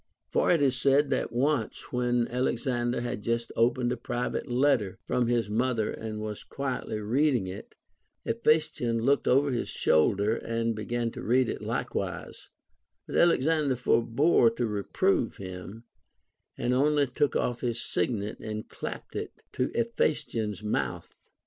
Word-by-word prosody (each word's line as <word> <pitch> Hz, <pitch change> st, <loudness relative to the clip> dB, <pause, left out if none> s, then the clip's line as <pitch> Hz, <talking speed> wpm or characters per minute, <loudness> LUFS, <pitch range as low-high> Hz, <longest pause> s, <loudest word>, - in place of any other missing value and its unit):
For -, -, +1 dB
it 165 Hz, -4 st, +4 dB
is 135 Hz, -2 st, +3 dB
said 140 Hz, +1 st, +3 dB
that 130 Hz, -, 0 dB
once, 130 Hz, -1 st, -1 dB
when 120 Hz, -1 st, +1 dB
Alexander 120 Hz, -1 st, -1 dB
had 120 Hz, -3 st, -3 dB
just 115 Hz, +2 st, -1 dB
opened 120 Hz, +1 st, +2 dB
a 125 Hz, -, -1 dB
private 120 Hz, +2 st, -3 dB
letter 125 Hz, -6 st, +2 dB
from 125 Hz, -1 st, +1 dB
his 120 Hz, -3 st, +1 dB
mother 115 Hz, +1 st, 0 dB
and 110 Hz, -1 st, -5 dB
was 105 Hz, -1 st, -5 dB
quietly 130 Hz, -5 st, -3 dB
reading 125 Hz, +2 st, +2 dB
it, 95 Hz, +2 st, -8 dB, 0.5 s
Hephaestion 120 Hz, -1 st, +1 dB
looked 140 Hz, +3 st, +2 dB
over 140 Hz, +2 st, +4 dB
his 120 Hz, -, -2 dB
shoulder 100 Hz, +8 st, +2 dB
and 115 Hz, 0 st, -1 dB
began 115 Hz, +2 st, -2 dB
to -, -, -8 dB
read 125 Hz, +2 st, +3 dB
it -, -, -4 dB
likewise; -, -, -4 dB, 0.6 s
but -, -, -6 dB
Alexander 155 Hz, -4 st, +3 dB
forbore 120 Hz, +3 st, +3 dB
to 120 Hz, -, 0 dB
reprove 115 Hz, -, 0 dB
him, 95 Hz, +4 st, -8 dB, 0.7 s
and 125 Hz, -, 0 dB
only 145 Hz, +2 st, +3 dB
took 135 Hz, +2 st, 0 dB
off 120 Hz, -1 st, 0 dB
his 120 Hz, -2 st, -1 dB
signet 105 Hz, -5 st, -2 dB
and 110 Hz, 0 st, -5 dB
clapped -, -, -7 dB
it -, -, -6 dB
to 125 Hz, -, -1 dB
Hephaestion's 115 Hz, -, -1 dB
mouth. 70 Hz, -, -2 dB
120 Hz, 145 wpm, -28 LUFS, 110-135 Hz, 0.7 s, it